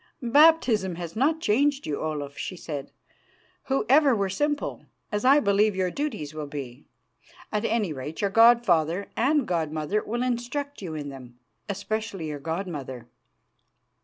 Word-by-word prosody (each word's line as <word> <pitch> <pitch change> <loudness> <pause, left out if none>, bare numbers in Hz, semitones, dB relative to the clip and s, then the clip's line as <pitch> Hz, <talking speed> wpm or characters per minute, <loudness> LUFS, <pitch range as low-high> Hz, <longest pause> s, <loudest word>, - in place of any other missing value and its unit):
"Baptism 265 - +5
has 170 -1 -7
not 300 +7 +2
changed 280 +5 +2
you, 145 - -3
Olaf," 145 -3 -4
she 185 - -5
said, 145 -5 -6 0.7
"who 270 0 0
ever 275 -1 +5
were 200 -2 -1
simple, 295 +8 -2 0.2
as 210 -1 -1
I 275 +3 +6
believe 205 -2 +2
your 185 -1 0
duties 175 - -4
will 155 -1 -5
be. 140 -2 -8 0.6
At 210 +1 -1
any 215 -8 0
rate, 145 +3 -7
your 200 -1 0
god 235 +2 +6
father 170 +1 +1
and 275 +2 +2
god 165 -4 -1
mother 155 +7 -1
will 240 +3 -2
instruct 255 +3 -3
you 165 -5 -5
in 145 -2 -5
them 125 -3 -11 0.3
especially 200 -3 -3
your 145 -1 -5
god 165 +7 -3
mother. 130 -7 -7
200 Hz, 160 wpm, -26 LUFS, 155-240 Hz, 0.7 s, I